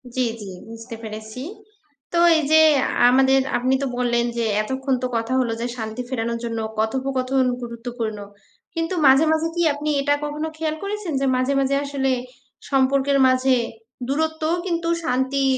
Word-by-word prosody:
জ্বী, 255 Hz, -1 st, +1 dB
জ্বী। 200 Hz, -3 st, -8 dB, 0.2 s
বুঝতে 230 Hz, +1 st, -8 dB
পেরেছি। 220 Hz, +2 st, -7 dB, 0.7 s
তো 340 Hz, -, +2 dB, 0.2 s
এই 315 Hz, -, 0 dB
যে 315 Hz, 0 st, +7 dB, 0.2 s
আ -, -, 0 dB, 0.2 s
আমাদের, 265 Hz, +1 st, +4 dB, 0.2 s
আপনি 255 Hz, +2 st, +1 dB
তো -, -, 0 dB
বললেন 240 Hz, -1 st, +1 dB
যে 230 Hz, -, 0 dB, 0.2 s
এতক্ষণ 265 Hz, +3 st, -2 dB
তো -, -, +1 dB
কথা 230 Hz, +2 st, -2 dB
হলো 240 Hz, -3 st, 0 dB
যে 240 Hz, -, -1 dB
শান্তি 220 Hz, +1 st, -4 dB
ফেরানোর 235 Hz, -2 st, -2 dB
জন্য 230 Hz, -1 st, -3 dB, 0.2 s
কথোপকথন 260 Hz, +3 st, 0 dB, 0.2 s
গুরুত্বপূর্ণ। 235 Hz, -2 st, -5 dB, 0.6 s
কিন্তু 330 Hz, +2 st, -1 dB
মাঝে, 270 Hz, +3 st, +6 dB
মাঝে 320 Hz, +1 st, +1 dB
কি 345 Hz, -, 0 dB
আপনি 295 Hz, +1 st, -3 dB
এটা 285 Hz, +1 st, +2 dB
কখনো 300 Hz, +1 st, -3 dB
খেয়াল 315 Hz, -1 st, -2 dB
করেছেন 400 Hz, -4 st, -4 dB
যে -, -, +1 dB
মাঝে, 255 Hz, +2 st, +1 dB
মাঝে 275 Hz, 0 st, +1 dB
আসলে, 275 Hz, -1 st, -1 dB, 0.6 s
সম্পর্কের 275 Hz, +1 st, +3 dB
মাঝে 255 Hz, 0 st, +3 dB, 0.5 s
দূরত্বও 315 Hz, +3 st, 0 dB
কিন্তু 335 Hz, -1 st, -1 dB
শান্তি 265 Hz, -1 st, 0 dB
265 Hz, 160 wpm, -22 LUFS, 240-290 Hz, 0.7 s, যে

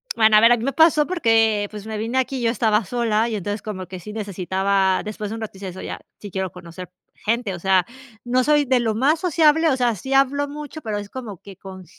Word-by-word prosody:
Bueno, 220 Hz, -1 st, +5 dB
a -, -, +8 dB
ver, 230 Hz, +2 st, +7 dB
a 240 Hz, -, +5 dB
mí 225 Hz, -, -6 dB
me 275 Hz, +2 st, -1 dB
pasó 320 Hz, -2 st, +4 dB
porque, 225 Hz, -, +2 dB
pues, 210 Hz, -1 st, -9 dB
me 220 Hz, -1 st, -5 dB
vine 230 Hz, +4 st, -2 dB
aquí 260 Hz, +1 st, 0 dB
y -, -, -4 dB
yo 230 Hz, -, +2 dB
estaba 220 Hz, -1 st, +1 dB
sola 230 Hz, +1 st, 0 dB
y 220 Hz, -, -3 dB
entonces 205 Hz, +1 st, -4 dB
como 190 Hz, -4 st, -6 dB
que 185 Hz, -1 st, -8 dB
sí 210 Hz, +5 st, -9 dB
necesitaba 195 Hz, -2 st, 0 dB
después 210 Hz, -1 st, -5 dB
de 225 Hz, -, -5 dB
un 225 Hz, -, -7 dB
rato, 220 Hz, -, -5 dB
decía, 190 Hz, 0 st, -7 dB
o -, -, -7 dB
sea, 190 Hz, -, -9 dB
ya, -, -, -6 dB, 0.2 s
sí 205 Hz, -3 st, -9 dB
quiero 190 Hz, -1 st, -3 dB
conocer 180 Hz, 0 st, -10 dB, 0.2 s
gente, 225 Hz, -2 st, -2 dB
o 175 Hz, -, -7 dB
sea, 190 Hz, -1 st, +2 dB, 0.4 s
no 250 Hz, +1 st, +1 dB
soy 295 Hz, 0 st, +3 dB
de 255 Hz, -1 st, +2 dB
lo 220 Hz, -2 st, -1 dB
más 290 Hz, +7 st, +2 dB
sociable, 320 Hz, -2 st, +3 dB
o 265 Hz, -, +1 dB
sea, 245 Hz, -2 st, +2 dB
sí, 265 Hz, +7 st, -5 dB
hablo 275 Hz, +1 st, +2 dB
mucho, 300 Hz, +1 st, -8 dB
pero 215 Hz, -3 st, -3 dB
es 205 Hz, 0 st, -7 dB
como 230 Hz, -8 st, -7 dB
que 195 Hz, 0 st, -14 dB
con 190 Hz, -1 st, -11 dB
220 Hz, 260 wpm, -22 LUFS, 200-260 Hz, 0.4 s, a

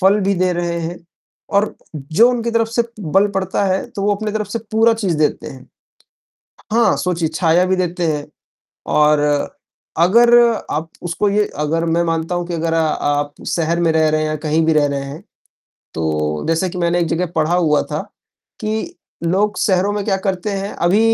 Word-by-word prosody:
फल 195 Hz, +2 st, +4 dB
भी 200 Hz, 0 st, +1 dB
दे 185 Hz, 0 st, +1 dB
रहे 170 Hz, 0 st, -2 dB
हैं, 170 Hz, +2 st, -5 dB, 0.5 s
और 200 Hz, +1 st, +1 dB, 0.2 s
जो 155 Hz, -, +3 dB
उनकी 235 Hz, -1 st, -2 dB
तरफ 230 Hz, -1 st, +1 dB
से 235 Hz, +1 st, +1 dB, 0.2 s
बल 195 Hz, +3 st, +2 dB
पड़ता 190 Hz, +1 st, 0 dB
है, 190 Hz, 0 st, 0 dB
तो 205 Hz, -5 st, -5 dB
वो 205 Hz, 0 st, +2 dB
अपनी 210 Hz, +1 st, -4 dB
तरफ 215 Hz, -2 st, -2 dB
से 230 Hz, -, -3 dB
पूरा 225 Hz, +1 st, +4 dB
चीज़ 195 Hz, -7 st, -1 dB
देते 150 Hz, -, 0 dB
हैं। 130 Hz, -1 st, -12 dB, 1.0 s
हाँ, 235 Hz, +1 st, +3 dB
सोचिए, 170 Hz, -3 st, -1 dB
छाया 170 Hz, +1 st, +3 dB
भी 190 Hz, 0 st, +1 dB
देते 180 Hz, -1 st, -1 dB
हैं, 145 Hz, -1 st, -4 dB, 0.6 s
और 150 Hz, 0 st, +3 dB, 0.8 s
अगर 235 Hz, +8 st, +5 dB, 0.4 s
आप 160 Hz, +2 st, -2 dB
उसको 175 Hz, +4 st, -1 dB
ये 210 Hz, +1 st, +2 dB, 0.2 s
अगर 165 Hz, +2 st, 0 dB
मैं 170 Hz, -, +3 dB
मानता 165 Hz, +1 st, -1 dB
हूँ 175 Hz, -1 st, -2 dB
कि 175 Hz, -, -4 dB
अगर 165 Hz, 0 st, -1 dB
आप 145 Hz, -2 st, 0 dB
शहर 170 Hz, 0 st, 0 dB
में 165 Hz, -1 st, +2 dB
रह 160 Hz, -1 st, +3 dB
रहे 155 Hz, 0 st, +1 dB
हैं, 155 Hz, -, -1 dB
या 155 Hz, -, -2 dB
कहीं 160 Hz, +2 st, +2 dB
भी 160 Hz, -, +4 dB
रह 150 Hz, -1 st, +4 dB
रहे 140 Hz, -1 st, -2 dB
हैं, 140 Hz, +3 st, -8 dB, 0.7 s
तो 75 Hz, -1 st, -1 dB
जैसे 165 Hz, +3 st, +1 dB
कि 180 Hz, -, -6 dB
मैंने 175 Hz, 0 st, +1 dB
एक 170 Hz, -, +1 dB
जगह 175 Hz, +2 st, 0 dB
पढ़ा 160 Hz, +2 st, +2 dB
हुआ 160 Hz, -4 st, +2 dB
था -, -, -1 dB, 0.6 s
कि 220 Hz, +11 st, -3 dB, 0.3 s
लोग 200 Hz, +5 st, +1 dB
शहरों 190 Hz, +1 st, +2 dB
में 205 Hz, -1 st, -2 dB
क्या 195 Hz, -2 st, +1 dB
करते 190 Hz, +2 st, -1 dB
हैं 195 Hz, 0 st, -3 dB, 0.2 s
अभी 195 Hz, +5 st, +3 dB
175 Hz, 195 wpm, -18 LUFS, 160-200 Hz, 1.0 s, अगर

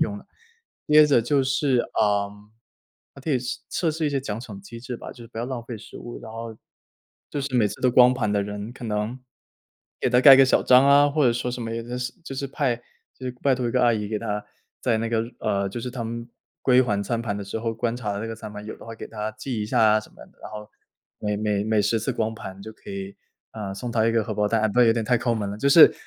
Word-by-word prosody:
用 100 Hz, -, 0 dB
的。 -, -, -16 dB, 0.6 s
接 150 Hz, 0 st, +8 dB
着 140 Hz, -5 st, +4 dB
就 140 Hz, +3 st, +2 dB
是， 135 Hz, -1 st, +2 dB, 0.2 s
嗯， 105 Hz, 0 st, -1 dB, 0.6 s
还 140 Hz, -, -12 dB
可 -, -, -7 dB
以 135 Hz, -, +3 dB
试 125 Hz, 0 st, -4 dB
测 170 Hz, -, 0 dB
试 155 Hz, 0 st, -1 dB
一 -, -, 0 dB
些 135 Hz, -1 st, 0 dB
奖 110 Hz, -4 st, -4 dB
惩 110 Hz, -5 st, -9 dB
机 115 Hz, +4 st, -10 dB
制 125 Hz, 0 st, -6 dB
吧， -, -, -9 dB
就 -, -, -23 dB
是 -, -, -13 dB
不 110 Hz, -, -15 dB
要 115 Hz, -, -1 dB
浪 130 Hz, -3 st, -4 dB
费 120 Hz, -1 st, -6 dB
食 -, -, -12 dB
物， 120 Hz, -, -8 dB
然 110 Hz, -, -9 dB
后， 115 Hz, -1 st, -7 dB, 0.7 s
就 145 Hz, -, -2 dB
是 135 Hz, -1 st, -4 dB
每 110 Hz, -3 st, +4 dB
次 -, -, -9 dB
都 125 Hz, -, +4 dB
光 125 Hz, 0 st, +7 dB
盘 115 Hz, -5 st, -1 dB
的 100 Hz, -, +2 dB
人 105 Hz, +3 st, -6 dB
可 125 Hz, -, -10 dB
能， 105 Hz, +3 st, -2 dB, 0.8 s
给 -, -, +2 dB
他 125 Hz, 0 st, +5 dB
盖 135 Hz, 0 st, +10 dB
个 135 Hz, -, +7 dB
小 130 Hz, -, +3 dB
章 130 Hz, +2 st, +6 dB
啊。 145 Hz, +1 st, +6 dB
或 150 Hz, +1 st, +1 dB
者 120 Hz, -, +5 dB
说 125 Hz, +1 st, -2 dB
什 125 Hz, -1 st, -5 dB
么 115 Hz, -, -4 dB
也 115 Hz, -, -3 dB
真 120 Hz, +1 st, -5 dB
是 125 Hz, 0 st, -3 dB
就 135 Hz, -, -6 dB
是 140 Hz, +1 st, -3 dB
派 135 Hz, -3 st, 0 dB, 0.4 s
就 130 Hz, -, -6 dB
是 -, -, -1 dB
拜 135 Hz, -2 st, +4 dB
托 125 Hz, -1 st, -2 dB
一 -, -, -1 dB
个 125 Hz, -, +2 dB
阿 120 Hz, -, +5 dB
姨 105 Hz, -2 st, -2 dB
给 110 Hz, -, -2 dB
他， 105 Hz, -1 st, -3 dB, 0.4 s
在 115 Hz, -3 st, +1 dB
那 115 Hz, 0 st, -1 dB
个 115 Hz, -1 st, +1 dB, 0.2 s
呃， 100 Hz, -2 st, 0 dB
就 100 Hz, -, -6 dB
是 125 Hz, -, -4 dB
他 125 Hz, -1 st, -5 dB
们， 115 Hz, +1 st, -5 dB, 0.3 s
归 130 Hz, 0 st, +5 dB
还 105 Hz, -5 st, 0 dB
餐 115 Hz, +3 st, -2 dB
盘 100 Hz, -3 st, -2 dB
的 100 Hz, -, -5 dB
时 100 Hz, +3 st, -4 dB
候 115 Hz, -1 st, -2 dB
观 115 Hz, +1 st, -1 dB
察 105 Hz, -5 st, -3 dB
的 100 Hz, -, -4 dB
那 115 Hz, -, -4 dB
个 115 Hz, -, -5 dB
餐 110 Hz, -1 st, -8 dB
盘， 105 Hz, 0 st, -8 dB
有 110 Hz, -, -7 dB
的 -, -, -13 dB
话 115 Hz, -, -7 dB
给 -, -, -8 dB
他 105 Hz, -1 st, -4 dB
记 110 Hz, 0 st, -4 dB
一 -, -, -3 dB
下 -, -, +1 dB
啊 110 Hz, 0 st, +5 dB
什 110 Hz, -, -15 dB
么 -, -, -25 dB
的。 -, -, -26 dB
然 -, -, -8 dB
后 105 Hz, 0 st, -8 dB, 0.5 s
每 105 Hz, -1 st, -1 dB
每 105 Hz, -1 st, 0 dB
每 110 Hz, -1 st, +2 dB
10 110 Hz, +2 st, +1 dB
次 -, -, -1 dB
光 110 Hz, 0 st, -1 dB
盘 95 Hz, -3 st, -9 dB
就 110 Hz, -, -8 dB
可 -, -, -13 dB
以， 100 Hz, 0 st, -6 dB, 0.4 s
啊， 105 Hz, -3 st, -5 dB
送 120 Hz, +3 st, -5 dB
他 115 Hz, -1 st, +2 dB
一 115 Hz, -, +2 dB
个 115 Hz, -2 st, +2 dB
荷 110 Hz, -3 st, -4 dB
包 105 Hz, 0 st, +1 dB
蛋， 110 Hz, -1 st, +2 dB
那 125 Hz, -, +6 dB
有 115 Hz, -, +5 dB
点 115 Hz, -1 st, -1 dB
太 125 Hz, +3 st, +3 dB
抠 120 Hz, 0 st, 0 dB
门 105 Hz, -2 st, -2 dB
了。 105 Hz, -, -6 dB
就 140 Hz, -, +2 dB
是 155 Hz, +3 st, +9 dB
115 Hz, 300 characters per minute, -24 LUFS, 105-125 Hz, 0.8 s, 盖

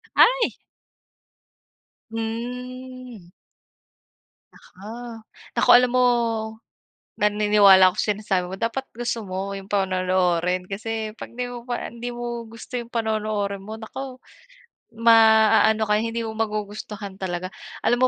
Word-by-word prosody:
Ay! -, -, +4 dB, 1.6 s
Hmm. 250 Hz, -1 st, -6 dB, 1.2 s
Naku 195 Hz, +3 st, -15 dB, 0.7 s
naku -, -, +1 dB
alam 250 Hz, 0 st, +5 dB
mo, 255 Hz, -, +4 dB, 1.2 s
naniniwala 205 Hz, -2 st, +6 dB
ako 185 Hz, -, -14 dB
sinasabi 205 Hz, -3 st, 0 dB
mo 190 Hz, -, -6 dB
dapat 230 Hz, +6 st, -2 dB
gusto 240 Hz, -1 st, -2 dB
mo 190 Hz, +2 st, -4 dB
yung 195 Hz, 0 st, -12 dB
panonoorin, 185 Hz, -2 st, +1 dB
kasi 220 Hz, +2 st, -4 dB
'pag -, -, -8 dB
'di 250 Hz, +1 st, -2 dB
mo 245 Hz, -, -6 dB
pa 240 Hz, -, -3 dB
hindi 235 Hz, +1 st, -6 dB
mo 240 Hz, -1 st, -5 dB
gusto 230 Hz, +3 st, -7 dB
yung 235 Hz, 0 st, -10 dB
panonoorin 215 Hz, -3 st, -1 dB
mo, 215 Hz, +2 st, -7 dB
naku, 255 Hz, +4 st, -7 dB, 0.8 s
maaano 220 Hz, -1 st, +5 dB
ka, 210 Hz, -, +2 dB
hindi 230 Hz, +1 st, -2 dB
mo 220 Hz, -, -4 dB
magugustuhan 210 Hz, -2 st, -4 dB
talaga. 185 Hz, 0 st, -4 dB, 0.3 s
Alam 245 Hz, +1 st, +4 dB
220 Hz, 115 wpm, -23 LUFS, 195-235 Hz, 1.6 s, naniniwala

